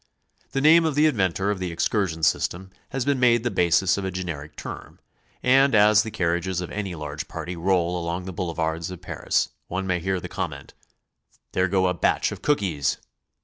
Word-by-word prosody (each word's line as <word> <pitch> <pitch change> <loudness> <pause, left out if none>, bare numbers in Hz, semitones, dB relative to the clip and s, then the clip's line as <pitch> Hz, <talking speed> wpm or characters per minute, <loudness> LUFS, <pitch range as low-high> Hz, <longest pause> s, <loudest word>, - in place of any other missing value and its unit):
The 135 - 0
name 160 +3 +7
of 160 -3 0
the 150 +1 +4
inventor 100 - +1
of 100 - -3
the 90 -2 -3
ex 85 - 0
cursion 85 -7 0
system 90 +3 0 0.2
has 135 -2 -2
been 140 -2 +1
made 120 -2 +4
the 120 - 0
basis 90 +1 +3
of - - -4
a 95 - -1
generic 85 -5 -6
term, - - -8 0.4
and 135 +1 +5
as 105 0 +6
the 110 - -4
carriages 90 -1 -1
of 90 - -5
any 100 -4 -4
large 75 -1 -6
party 90 - -6
roll 90 0 +1
along 85 +2 -3
the 95 - -6
boule 85 -1 -3
vards 80 +1 -2
of 90 -2 -8
Paris, - - -1 0.2
one 95 +2 -3
may 90 -2 0
hear 95 +2 -1
the - - -7
comment, - - -5 0.8
'There 90 0 +1
go 95 0 +2
a 90 - +2
batch 85 - +1
of - - -7
Cookies!" 90 - 0
95 Hz, 200 wpm, -24 LUFS, 85-105 Hz, 0.8 s, name